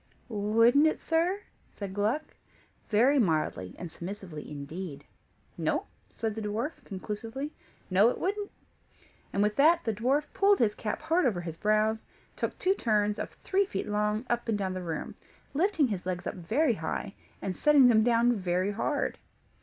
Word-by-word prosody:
"Wouldn't 230 +7 +4
it, 315 - 0
sir?" 345 +5 +1 0.3
said 200 -2 -7
Gluck, 215 +10 -1 0.6
very 250 +7 +4
mildly 155 - 0
and 175 -2 -7
submissively 175 -4 -7
indeed. 145 +1 -7 0.5
"No," - - 0 0.2
said 225 -2 -3
the 220 - -5
dwarf, 225 +9 -3
conclusively. 225 +8 -5 0.4
"No, 200 +5 +6
it - - -2
wouldn't." 405 +2 -2 0.8
And 200 - +1
with 210 0 0
that, 325 +4 +5
the 225 - 0
dwarf 260 +8 +1
pulled 400 0 +4
his 220 -3 +2
cap 215 +6 -4
hard 320 -1 +3
over 190 -7 -1
his 165 -2 -6
brows, 215 +2 +2
and - - -33 0.3
took - - -3
two 375 +1 +2
turns, 210 - +1
of - - -4
three 395 0 +2
feet - - -3
long, 210 +2 0
up 240 -1 -1
and 215 - +2
down 190 -2 -2
the 185 - -4
room, 165 -3 -4 0.4
lifting 320 -3 +2
his 195 -4 -3
legs 180 -1 -3
up - - -2
very 235 - +1
high, 195 +3 -4 0.3
and 190 -2 -3
setting 290 -4 +6
them 220 -3 +5
down 240 +1 +4
very 185 0 0
hard. 260 +8 -1
215 Hz, 170 wpm, -29 LUFS, 195-280 Hz, 0.8 s, No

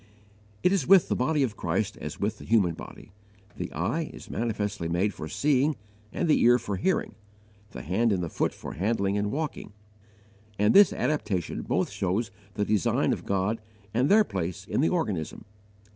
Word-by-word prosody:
It 180 - +4
is 190 -10 +1
with 195 -3 +6
the - - +1
Body 145 +3 +1
of 115 -5 -2
Christ - - -1
as 75 - -7
with 105 +1 -2
the - - -10
human 105 -7 +3
body: - - -11 0.4
the - - -5
eye 150 - -2
is - - -11
manifestly 105 -6 -2
made 90 +5 0
for 80 - -7
seeing 145 - +2 0.4
and 175 - -1
the 155 - +4
ear 120 +1 +6
for 100 -5 -4
hearing, 185 - 0 0.6
the 65 - -8
hand 110 +8 +1
and 90 -5 -1
foot - - 0
for - - -8
handling 100 +1 0
and 105 0 0
walking; 150 -8 -4 0.8
and 105 +1 +3
this 200 -1 +8
adaptation 105 - -1
both - - -1
shows 105 +5 -1 0.2
the 105 - 0
design 105 -4 +2
of - - -7
God 100 +3 0 0.3
and 125 +5 +2
their 215 +2 +6
place 95 - -4
in - - 0
the 160 - +3
organism. 105 - -2
105 Hz, 175 wpm, -27 LUFS, 95-140 Hz, 0.8 s, this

